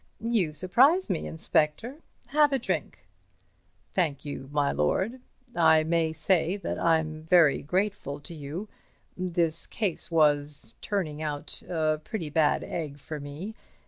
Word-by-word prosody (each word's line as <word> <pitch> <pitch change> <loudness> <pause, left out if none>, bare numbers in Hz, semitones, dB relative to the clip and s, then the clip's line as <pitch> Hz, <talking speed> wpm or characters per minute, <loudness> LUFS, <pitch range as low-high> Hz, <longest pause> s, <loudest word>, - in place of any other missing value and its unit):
"You 225 -9 +1
surprise 240 - +3
me, 170 - -2
Inspector. 160 - 0 0.3
Have 295 +1 +4
a 270 - +3
drink." 245 - -3 0.9
"Thank 155 -7 0
you, 135 -2 -6
my 145 -1 +2
lord. 190 - 0 0.3
I 160 -2 +5
may 165 0 +1
say 170 +3 +1
that 200 - -4
I'm 160 -2 +1
very 160 -3 +4
grateful 185 -3 -2
to 170 - -7
you—this 170 +1 -3
case 205 -7 -2
was 145 -6 +1
turning 160 -8 -2
out 150 -2 -3
a 155 -3 +1
pretty 175 -10 -5
bad 155 -1 +2
egg 150 -4 -4
for 150 +1 -7
me. 145 +9 -7
160 Hz, 130 wpm, -28 LUFS, 150-190 Hz, 0.9 s, I